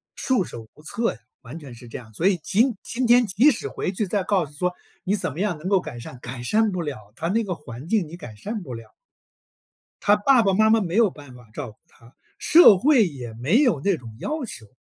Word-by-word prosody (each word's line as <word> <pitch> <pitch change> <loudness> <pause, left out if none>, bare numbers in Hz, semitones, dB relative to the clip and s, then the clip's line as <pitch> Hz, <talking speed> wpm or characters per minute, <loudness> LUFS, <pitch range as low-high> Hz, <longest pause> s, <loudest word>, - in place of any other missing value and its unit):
束 255 -7 +1
手 115 -8 -9
无 150 - -18
策 230 +8 -1
呀， - - -16 0.2
完 130 +6 -9
全 140 -5 -11
是 120 +1 -13
这 115 - -7
样。 110 -3 -13
所 165 - +1
以 195 -2 +3
今 235 +4 +2
今 250 +2 -2
天 240 +1 +6
即 225 +9 +4
使 - - -4
回 - - -3
去 200 +1 -2
再 195 +1 -1
告 190 -3 +1
诉 150 - -16
说 180 +2 -1 0.3
你 195 - 0
怎 195 - -2
么 150 - -8
样 200 -4 -1
能 155 +4 -7
够 195 -1 +3
改 120 -8 -8
善。 120 +1 -10
改 125 0 -7
善 215 - +2
不 185 -2 -3
了， 110 -10 -7
它 165 - -3
那 225 +4 +1
个 185 -4 -3
环 130 0 -10
境 205 -5 +1
你 160 - -9
改 120 -11 -10
善 210 - -5
不 135 -8 -8
了。 115 -1 -10 1.1
他 205 +1 +4
爸 240 +4 +4
爸 195 -2 +2
妈 220 +2 +4
妈 225 0 +4
没 180 -2 -3
有 225 -3 +4
办 145 -5 -13
法 125 -2 -16
照 115 - -6
顾 105 - -21
他， 120 -7 -21 0.3
社 315 - +7
会 260 -1 +4
也 130 -8 -7
没 140 - +2
有 245 - +2
那 195 +4 +1
种 115 -6 -12
要 300 - -3
求。 115 - -9
180 Hz, 265 characters per minute, -23 LUFS, -, 1.1 s, 社